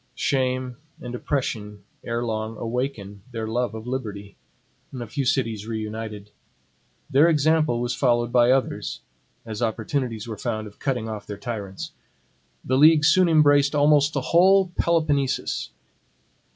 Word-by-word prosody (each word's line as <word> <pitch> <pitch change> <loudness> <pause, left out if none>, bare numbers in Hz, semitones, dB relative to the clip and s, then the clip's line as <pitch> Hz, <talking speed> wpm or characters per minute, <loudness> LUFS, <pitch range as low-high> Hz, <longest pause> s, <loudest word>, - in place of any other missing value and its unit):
Shame 130 -2 -1 0.2
and 125 0 -7
oppression 110 -6 -3 0.2
erelong 115 -2 -3
awaken 115 -4 -4
their 115 -2 -4
love 120 +1 -1
of 110 0 -7
liberty. 105 -6 -5 0.6
A 120 - -4
few 135 +5 -3
cities 115 -4 -1
reunited. 110 -2 -5 0.8
Their 145 +5 +5
example 155 -4 +2
was 120 0 -1
followed 120 -2 +1
by 120 -1 +4
others, 130 0 0 0.4
as 110 -1 -6
opportunities 115 0 -2
were 110 -3 -6
found 110 -3 -3
of 105 -1 -13
cutting 125 -5 -2
off 110 -2 -6
their 105 - -6
tyrants. 100 -3 -6 0.7
The 130 +1 +1
league 155 0 +6
soon 180 +3 +5
embraced 145 -2 +4
almost 145 0 +4
the - - -1
whole 190 +2 +4
Peloponnesus. 150 -5 0
120 Hz, 130 wpm, -24 LUFS, 110-140 Hz, 0.8 s, league